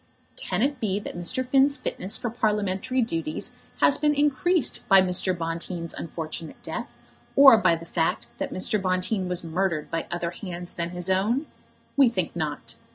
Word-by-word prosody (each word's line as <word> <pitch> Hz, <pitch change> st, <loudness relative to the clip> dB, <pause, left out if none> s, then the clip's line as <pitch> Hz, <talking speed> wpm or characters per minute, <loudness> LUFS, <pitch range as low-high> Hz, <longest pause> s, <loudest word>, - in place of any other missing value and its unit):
Can 185 Hz, +4 st, -2 dB
it 280 Hz, -1 st, 0 dB
be 205 Hz, -3 st, -1 dB
that 205 Hz, -, -8 dB
Mr. 175 Hz, +9 st, 0 dB
Finn's 275 Hz, +2 st, +4 dB
fitness 190 Hz, +3 st, -2 dB
for 240 Hz, -, -3 dB
Parliamentary 210 Hz, +2 st, 0 dB
duties 165 Hz, -8 st, -3 dB, 0.3 s
has 280 Hz, -, +4 dB
been 295 Hz, 0 st, +2 dB
increased 295 Hz, +2 st, +2 dB
by 195 Hz, -1 st, +8 dB
Mr. 185 Hz, 0 st, +3 dB
Bonteen's 170 Hz, +1 st, -4 dB
unfortunate 160 Hz, 0 st, -6 dB
death, -, -, -6 dB, 0.4 s
or 275 Hz, -3 st, +9 dB
by 170 Hz, -, +4 dB
the 165 Hz, 0 st, -9 dB
fact 165 Hz, -8 st, -1 dB
that -, -, -3 dB
Mr. 195 Hz, +2 st, +1 dB
Bonteen 185 Hz, +1 st, -1 dB
was 180 Hz, -1 st, -1 dB
murdered 170 Hz, -1 st, -1 dB
by 165 Hz, -1 st, -2 dB
other 175 Hz, 0 st, -3 dB
hands 175 Hz, -1 st, -8 dB
than 170 Hz, 0 st, -3 dB
his 180 Hz, 0 st, -3 dB
own? 220 Hz, +10 st, +1 dB, 0.5 s
We 275 Hz, -3 st, +6 dB
think 185 Hz, -8 st, -3 dB
not. 145 Hz, -8 st, -4 dB
185 Hz, 165 wpm, -25 LUFS, 170-235 Hz, 0.5 s, or